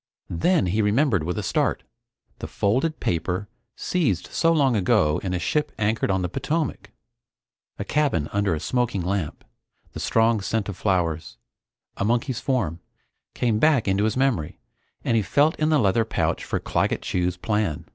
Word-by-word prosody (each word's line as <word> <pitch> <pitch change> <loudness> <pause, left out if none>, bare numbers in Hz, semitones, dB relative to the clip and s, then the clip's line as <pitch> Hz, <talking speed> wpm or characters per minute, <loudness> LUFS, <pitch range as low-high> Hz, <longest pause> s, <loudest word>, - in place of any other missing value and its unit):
Then 160 - +2
he 100 +5 +1
remembered 105 - +2
with 90 +2 -3
a - - -2
start - - 0 0.6
the - - -5
folded 130 +11 0
paper 90 +4 -1 0.3
seized 135 - 0
so 165 - +2
long 140 -6 +3
ago 95 -7 +2
in 95 - -3
a - - +1
ship 150 - -1
anchored 110 +1 0
on 95 -1 +1
the - - 0
Potomac. 130 - -2 0.9
A - - -3
cabin 140 - +1
under 100 -4 +1
a - - -4
smoking 120 -3 -1
lamp, 90 -4 -3 0.5
the - - -6
strong 115 -1 +2
scent 105 +1 -1
of 100 - -4
flowers, 85 - -1 0.6
a - - -1
monkey's 120 +3 0
form, 110 - -1 0.6
came 115 -3 +1
back 145 -5 +3
into 100 +2 +2
his 110 - 0
memory 130 - 0 0.5
and 115 - +1
he 110 - +3
felt 145 +10 +2
in 155 0 +2
the 155 - +4
leather 115 -1 +3
pouch 110 - -1
for - - -2
Claggett - - -1
Chew's 90 0 -1
plan. 105 -5 -1
105 Hz, 165 wpm, -24 LUFS, 90-130 Hz, 0.9 s, the